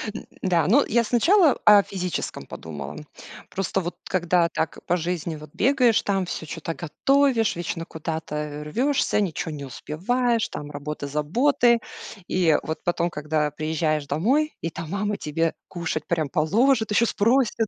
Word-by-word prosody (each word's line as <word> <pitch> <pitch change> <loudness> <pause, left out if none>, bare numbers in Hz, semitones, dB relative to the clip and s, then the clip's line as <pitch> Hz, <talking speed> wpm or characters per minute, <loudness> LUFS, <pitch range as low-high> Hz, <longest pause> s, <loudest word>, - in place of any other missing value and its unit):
Н - - -7 0.2
да, 170 -5 +2
ну, 265 +8 +5
я 235 +1 +3
сначала 305 - +4
о 205 -1 +8
физическом 180 -3 -4
подумала. 75 -3 -7 0.5
Просто, 195 0 -1
вот, 175 0 -5
когда, 175 -1 +2
так, 160 - -3
по 175 - +2
жизни, 170 -1 -3
вот, 150 0 -11
бегаешь, 250 -2 +3
там, 195 -2 0
всё 165 - -5
чё-то 165 +1 -5
готовишь, 260 - +2
вечно 165 -1 -4
куда-то 150 -2 -5
рвёшься, 250 - +1
ничё 175 -2 -2
не 145 -2 -6
успеваешь, 230 - -1
там, 145 0 -7
работа, 145 0 -5
заботы. 235 - +2 0.5
И 170 -4 +3
вот 160 - -5
потом, 175 0 0
когда 150 -1 -1
приезжаешь 155 -1 -1
домой, 260 - +1
и 165 - -2
там 165 0 -7
мама 205 +3 -1
тебе 165 +2 -1
кушать 165 -3 -4
прям 160 -4 0
положит, 220 - +2
ещё 230 +3 +4
спросит. 230 0 +2
175 Hz, 150 wpm, -24 LUFS, 155-225 Hz, 0.5 s, о